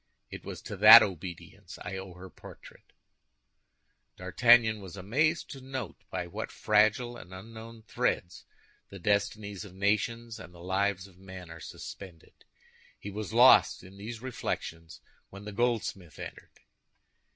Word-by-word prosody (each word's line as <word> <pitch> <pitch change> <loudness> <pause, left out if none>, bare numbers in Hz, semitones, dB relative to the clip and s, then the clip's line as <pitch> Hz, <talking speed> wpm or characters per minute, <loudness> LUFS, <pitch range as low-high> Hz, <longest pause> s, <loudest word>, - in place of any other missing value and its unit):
It - - -8
was - - -8
to - - -6
that - - +11
obedience 90 -2 -7
I 95 +1 -5
owe 95 -2 -8
her 95 +1 -11
portrait." - - -15 1.3
D'Artagnan 110 +4 +4
was 95 0 -10
amazed 150 - 0
to 135 - -9
note 130 -7 -6
by - - -3
what - - -6
fragile 110 +3 +2
and 90 -5 -13
unknown 110 +3 -11
threads 90 -4 -2 0.4
the 100 - -10
destinies 100 +1 -1
of 95 -3 -12
nations 110 +4 -1
and 90 0 -12
the 85 - -13
lives 95 0 0
of 95 -2 -18
men 95 -3 -10
are 85 - -10
suspended. 90 0 -10 0.7
He 100 - -7
was 105 0 -5
lost 120 -3 +6
in 95 +1 -14
these 110 +3 -8
reflections 85 -9 -5 0.3
when 100 +1 -11
the 105 - -6
goldsmith 105 - -2
entered. - - -10
100 Hz, 140 wpm, -29 LUFS, 95-115 Hz, 1.3 s, that